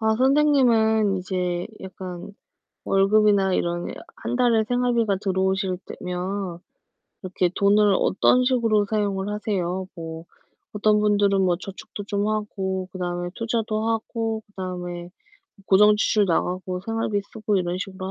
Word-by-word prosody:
아 220 Hz, 0 st, +2 dB
선생님은 240 Hz, -7 st, +3 dB
이제 180 Hz, -1 st, -2 dB
약간 185 Hz, 0 st, -8 dB, 0.5 s
월급이나 195 Hz, 0 st, +3 dB
이런 175 Hz, -1 st, -1 dB, 0.3 s
1 230 Hz, +2 st, -4 dB
달에 235 Hz, -3 st, +3 dB
생활비가 235 Hz, -4 st, +1 dB
들어오실 190 Hz, -1 st, 0 dB
때면 180 Hz, 0 st, -4 dB, 0.6 s
이렇게 185 Hz, -1 st, 0 dB
돈을 205 Hz, 0 st, +4 dB
어떤 250 Hz, +6 st, +3 dB
식으로 230 Hz, -5 st, +2 dB
사용을 200 Hz, -2 st, -1 dB
하세요? 190 Hz, -3 st, -2 dB
뭐 165 Hz, -1 st, -7 dB, 0.5 s
어떤 210 Hz, 0 st, +3 dB
분들은 205 Hz, -2 st, +3 dB
뭐 180 Hz, -2 st, +2 dB
저축도 195 Hz, +2 st, -9 dB
좀 205 Hz, +1 st, -1 dB
하고 190 Hz, -3 st, -2 dB
그다음에 175 Hz, -1 st, -3 dB
투자도 225 Hz, -1 st, -1 dB
하고 225 Hz, 0 st, -2 dB
그다음에 180 Hz, -3 st, -6 dB, 0.6 s
고정지출 210 Hz, +1 st, +4 dB
나가고 180 Hz, +1 st, -1 dB
생활비 220 Hz, 0 st, -1 dB
쓰고 215 Hz, -2 st, -1 dB
이런 180 Hz, 0 st, -1 dB
식으로 190 Hz, 0 st, -5 dB
200 Hz, 285 characters per minute, -24 LUFS, 185-220 Hz, 0.6 s, 돈을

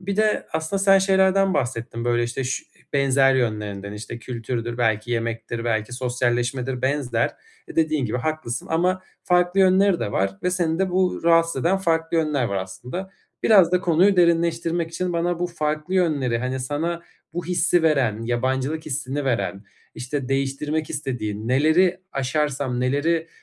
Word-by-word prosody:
bir 195 Hz, +1 st, -3 dB
de 215 Hz, 0 st, +1 dB
aslında 160 Hz, +5 st, -1 dB
sen 195 Hz, -1 st, +6 dB
şeylerden 190 Hz, 0 st, +3 dB
bahsettin, 115 Hz, -2 st, -2 dB
böyle, 120 Hz, 0 st, +2 dB
işte, 120 Hz, +3 st, -3 dB
şu 130 Hz, -, -2 dB
e, -, -, -31 dB
benzer 135 Hz, -1 st, +3 dB
yönlerinden. 105 Hz, -5 st, -2 dB
İşte, 110 Hz, +2 st, -7 dB
kültürdür 120 Hz, 0 st, -4 dB
belki 110 Hz, 0 st, 0 dB
yemektir 115 Hz, 0 st, -3 dB
belki 110 Hz, 0 st, -1 dB
sosyalleşmedir 125 Hz, +1 st, -1 dB
benzer. 135 Hz, -1 st, 0 dB, 0.4 s
E, -, -, -10 dB
dediğin 155 Hz, -4 st, +2 dB
gibi 125 Hz, +4 st, -2 dB
haklısın 155 Hz, -4 st, -3 dB
ama 180 Hz, +3 st, +1 dB, 0.2 s
farklı 180 Hz, +1 st, +3 dB
yönleri 190 Hz, 0 st, +4 dB
de 100 Hz, -, -2 dB
var 95 Hz, 0 st, -1 dB
ve 180 Hz, -, +1 dB
seni 170 Hz, -2 st, 0 dB
de 190 Hz, -1 st, +1 dB
bu 185 Hz, 0 st, +1 dB
rahatsız 165 Hz, -4 st, +3 dB
eden 185 Hz, +3 st, +3 dB
farklı 165 Hz, -2 st, 0 dB
yönler 150 Hz, -5 st, +1 dB
var, 100 Hz, -3 st, -2 dB
aslında. 120 Hz, -, -6 dB, 0.3 s
Biraz 190 Hz, -6 st, +6 dB
da 180 Hz, -, +3 dB
konuyu 180 Hz, +3 st, +3 dB
derinleştirmek 170 Hz, -1 st, +2 dB
için 180 Hz, +1 st, -2 dB
bana 170 Hz, 0 st, 0 dB
bu 175 Hz, -, 0 dB
farklı 155 Hz, +1 st, -3 dB
yönleri, 145 Hz, -10 st, +1 dB
hani, 130 Hz, +1 st, -3 dB
sana 165 Hz, +6 st, -2 dB, 0.3 s
bu 175 Hz, 0 st, -4 dB
hissi 175 Hz, -1 st, +2 dB
veren, 130 Hz, -9 st, +2 dB
yabancılık 130 Hz, +6 st, -1 dB
hissini 140 Hz, 0 st, -3 dB
veren, 100 Hz, -5 st, -1 dB, 0.3 s
işte, 130 Hz, +1 st, -4 dB
değiştirmek 140 Hz, +3 st, -1 dB
istediğin, 110 Hz, -5 st, -4 dB
"Neleri 160 Hz, +8 st, +3 dB
aşarsam 135 Hz, -2 st, -1 dB
neleri 160 Hz, +6 st, 0 dB
145 Hz, 155 wpm, -23 LUFS, 120-170 Hz, 0.4 s, sen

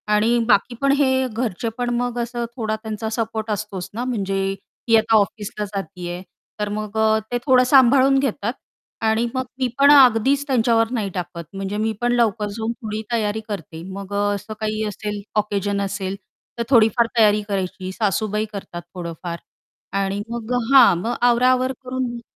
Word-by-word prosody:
आणि 230 Hz, +3 st, +3 dB
बाकी 240 Hz, +2 st, +3 dB
पण 275 Hz, 0 st, +3 dB
हे 260 Hz, -2 st, +2 dB
घरचे 230 Hz, -1 st, -3 dB
पण 245 Hz, 0 st, -1 dB
मग 245 Hz, 0 st, -2 dB
असं 235 Hz, 0 st, -3 dB
थोडा 220 Hz, -3 st, -2 dB
त्यांचा 220 Hz, 0 st, -5 dB
सपोर्ट 220 Hz, -1 st, -3 dB
असतोच 205 Hz, -3 st, -4 dB
ना, 235 Hz, +3 st, -3 dB
म्हणजे 200 Hz, -6 st, -2 dB, 0.5 s
ही 225 Hz, -, +6 dB
आता 220 Hz, 0 st, +2 dB
ऑफिसला 210 Hz, 0 st, -1 dB
जाती 190 Hz, -3 st, -6 dB
आहे, 175 Hz, +1 st, -5 dB, 0.4 s
तर 210 Hz, -1 st, -1 dB
मग 215 Hz, +1 st, -4 dB
अ, 220 Hz, 0 st, +3 dB
ते 245 Hz, -, +1 dB
थोडं 255 Hz, -2 st, +5 dB
सांभाळून 270 Hz, +1 st, +5 dB
घेतात 235 Hz, -3 st, -1 dB, 0.5 s
आणि 220 Hz, +2 st, +2 dB
मग 260 Hz, 0 st, -1 dB
मी 260 Hz, -, +2 dB
पण 280 Hz, +1 st, +7 dB
अगदीच 270 Hz, +1 st, +5 dB
त्यांच्यावर 230 Hz, -2 st, +2 dB
नाही 215 Hz, -5 st, -1 dB
टाकत. 175 Hz, -1 st, -5 dB
म्हणजे 195 Hz, +1 st, -4 dB
मी 220 Hz, +1 st, 0 dB
पण 240 Hz, 0 st, +2 dB
लवकर 220 Hz, -3 st, +1 dB
जाऊन 225 Hz, 0 st, -2 dB
थोडी 220 Hz, -2 st, -5 dB
तयारी 220 Hz, -1 st, 0 dB
करते. 165 Hz, -5 st, -6 dB
मग 200 Hz, 0 st, -7 dB
अ, 205 Hz, -, +1 dB
असं 215 Hz, +2 st, -7 dB
काही 215 Hz, 0 st, -2 dB
असेल 210 Hz, 0 st, -5 dB, 0.2 s
ऑकेशन 205 Hz, -1 st, -1 dB
असेल 195 Hz, -1 st, -3 dB, 0.4 s
तर 235 Hz, -, 0 dB
थोडीफार 235 Hz, -1 st, +4 dB
तयारी 210 Hz, -1 st, +5 dB
करायची, 190 Hz, -1 st, -3 dB
सासूबाई 210 Hz, +1 st, -1 dB
करतात 175 Hz, -3 st, -7 dB
थोडंफार 170 Hz, -1 st, -6 dB, 0.6 s
आणि 195 Hz, +1 st, -2 dB
मग 235 Hz, +1 st, -4 dB
अ, -, -, +2 dB, 0.2 s
हां, 245 Hz, -9 st, +8 dB
मग 230 Hz, +7 st, -2 dB
आवरा 245 Hz, +1 st, +4 dB
आवर 255 Hz, 0 st, +1 dB
करून 255 Hz, 0 st, -2 dB
मग 235 Hz, -, -7 dB
220 Hz, 175 wpm, -21 LUFS, 200-240 Hz, 0.6 s, हां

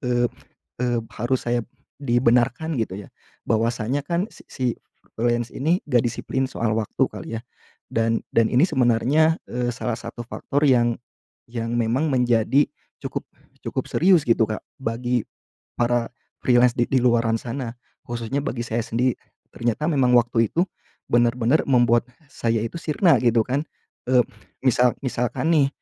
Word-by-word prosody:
eee 120 Hz, -1 st, +1 dB, 0.6 s
eee, 120 Hz, -1 st, +1 dB, 0.2 s
harus 120 Hz, +2 st, -1 dB
saya, 120 Hz, -1 st, +1 dB, 0.3 s
dibenarkan 125 Hz, +3 st, +2 dB
gitu 110 Hz, -5 st, -1 dB
ya. -, -, -22 dB, 0.4 s
Bahwasanya 115 Hz, +4 st, 0 dB
kan, 175 Hz, +3 st, -1 dB
si -, -, -17 dB
si 130 Hz, -, -4 dB, 0.5 s
freelance 120 Hz, 0 st, 0 dB
ini, 165 Hz, +7 st, 0 dB
enggak 120 Hz, -2 st, +3 dB
disiplin 130 Hz, +3 st, -1 dB
soal 115 Hz, -4 st, -1 dB
waktu 110 Hz, -2 st, 0 dB
kali -, -, -8 dB
ya. -, -, -13 dB, 0.5 s
Dan 115 Hz, 0 st, +1 dB
dan 115 Hz, -, +4 dB
ini 125 Hz, +5 st, +3 dB
sebenarnya, 145 Hz, +2 st, +3 dB
eee, 120 Hz, 0 st, -1 dB
salah 120 Hz, -2 st, -3 dB
satu 115 Hz, +1 st, -7 dB
faktor 140 Hz, +4 st, -3 dB
yang 120 Hz, -4 st, +4 dB, 0.6 s
yang 115 Hz, 0 st, -3 dB
memang 120 Hz, +6 st, +1 dB
menjadi 125 Hz, +1 st, +3 dB, 0.4 s
cukup -, -, -4 dB, 0.4 s
cukup -, -, -3 dB
serius 180 Hz, -1 st, +4 dB
gitu, 115 Hz, -3 st, +3 dB
Kak, 110 Hz, 0 st, -4 dB, 0.2 s
bagi 120 Hz, -1 st, -1 dB, 0.5 s
para 120 Hz, -1 st, +1 dB, 0.3 s
freelance 125 Hz, 0 st, +5 dB
di 120 Hz, -, +2 dB
di 130 Hz, -, +4 dB
luaran 115 Hz, -2 st, +3 dB
sana, 120 Hz, 0 st, -4 dB, 0.3 s
khususnya 120 Hz, +4 st, -3 dB
bagi 120 Hz, -4 st, -3 dB
saya 115 Hz, +1 st, -1 dB
sendiri. 120 Hz, +2 st, 0 dB, 0.4 s
Ternyata 120 Hz, +6 st, -1 dB
memang 135 Hz, -6 st, +3 dB
waktu 115 Hz, -1 st, +3 dB
itu, 170 Hz, -, +2 dB, 0.4 s
benar-benar 120 Hz, +4 st, +2 dB
membuat, 120 Hz, -3 st, +4 dB, 0.3 s
saya 115 Hz, -1 st, 0 dB
itu 115 Hz, -, -5 dB
sirna 165 Hz, +2 st, +3 dB
gitu 115 Hz, -2 st, +4 dB
kan, 135 Hz, +3 st, 0 dB, 0.5 s
eee, 125 Hz, -2 st, +6 dB, 0.4 s
misal 125 Hz, -1 st, +3 dB
misalkan 130 Hz, +4 st, -1 dB
nih, 140 Hz, -2 st, +4 dB
120 Hz, 145 wpm, -23 LUFS, 115-135 Hz, 0.6 s, eee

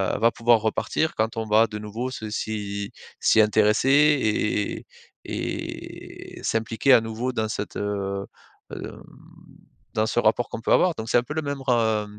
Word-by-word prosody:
heu, -, -, -3 dB
va 115 Hz, +2 st, +5 dB
pouvoir 115 Hz, 0 st, +3 dB
repartir 135 Hz, +8 st, -1 dB
quand 110 Hz, +1 st, -1 dB
on 110 Hz, -, -2 dB
va 110 Hz, +2 st, +4 dB
de 105 Hz, -, -6 dB
nouveau 110 Hz, +5 st, -5 dB
se 110 Hz, -4 st, -6 dB
s'y 100 Hz, -2 st, -4 dB, 0.3 s
s'y -, -, +4 dB
intéresser 105 Hz, +4 st, +3 dB
et 135 Hz, -8 st, +2 dB, 0.4 s
et -, -, -6 dB
s'impliquer 115 Hz, +4 st, +2 dB
à 120 Hz, -, +7 dB
nouveau 115 Hz, +3 st, -3 dB
dans 110 Hz, -3 st, -1 dB
cette, 105 Hz, -1 st, -4 dB
heu, 100 Hz, -1 st, -3 dB, 0.5 s
hem -, -, -6 dB
dans -, -, -9 dB, 0.9 s
dans 110 Hz, -, +1 dB
ce 120 Hz, -, 0 dB
rapport 120 Hz, +1 st, +2 dB
qu'on -, -, -5 dB
peut -, -, +2 dB
avoir 180 Hz, -1 st, +4 dB
donc 110 Hz, -, -6 dB
c'est -, -, +4 dB
un 120 Hz, -, +2 dB
peu 135 Hz, -, -6 dB
le 160 Hz, -, -1 dB
même 140 Hz, -2 st, -4 dB
re 135 Hz, -, -4 dB
heu, 110 Hz, -3 st, +2 dB
110 Hz, 180 wpm, -24 LUFS, 105-120 Hz, 0.9 s, à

